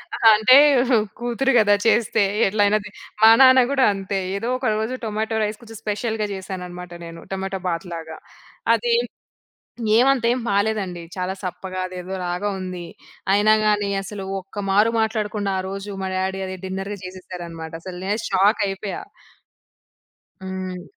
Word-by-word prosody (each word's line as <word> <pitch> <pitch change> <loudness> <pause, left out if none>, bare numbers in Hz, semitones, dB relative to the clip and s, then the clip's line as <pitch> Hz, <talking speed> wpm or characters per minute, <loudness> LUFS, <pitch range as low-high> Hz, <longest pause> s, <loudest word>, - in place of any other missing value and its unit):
ఆ! - - -3
అంటే, 220 +5 +6 0.6
కూతురు 240 +3 0
గదా! 205 -2 +5
చేస్తే 225 -2 +3 0.2
ఎట్లైనా 205 +1 +3
దిన్ 205 +1 -12 0.3
మా 220 - +10
నాన్న 260 0 +8
గూడా 270 -2 +3
అంతే. 195 0 -3 0.2
ఏదో 230 +5 -3
ఒక 255 - -6
రోజు 220 +3 -2
టొమాటో 220 +1 -2
రైస్ 210 0 -3
కొంచెం 225 -2 -11
స్పెషల్‌గా 215 +1 -2
చేశాననమాట 180 -2 -7
నేను. 165 0 -10
టొమాటో 190 0 -3
బాత్‌లాగా. 165 -2 -5 0.6
అది 480 - 0
ఏం - - -2 0.9
ఏవంతేం 250 -1 +3
బాలేదండి. 200 -3 0
చాలా 185 0 -2
సప్పగా 185 0 -5
అదేదోలాగా 180 +1 -4
ఉంది. 180 -2 -6 0.5
అయినా 210 +2 +5
గానీ 205 -1 +2
అసలు 195 0 -7 0.2
ఒక్క 195 +2 -7
మారు 210 +4 +4
మాట్లాడకుండా, 215 -2 -1
ఆ 185 - -2
రోజు 195 +1 -6
మా 190 - -2
డాడీ 190 +1 -2
అది 185 - -5
డిన్నర్‌గా 195 +2 -4
చేసేసారనమాట. 175 -3 -8
అసలు 180 -1 -7
నేను 210 +3 0
షాకయిపోయా. 200 0 +1 1.4
హ్మ్. 185 -1 -5
195 Hz, 135 wpm, -22 LUFS, 185-215 Hz, 1.4 s, మా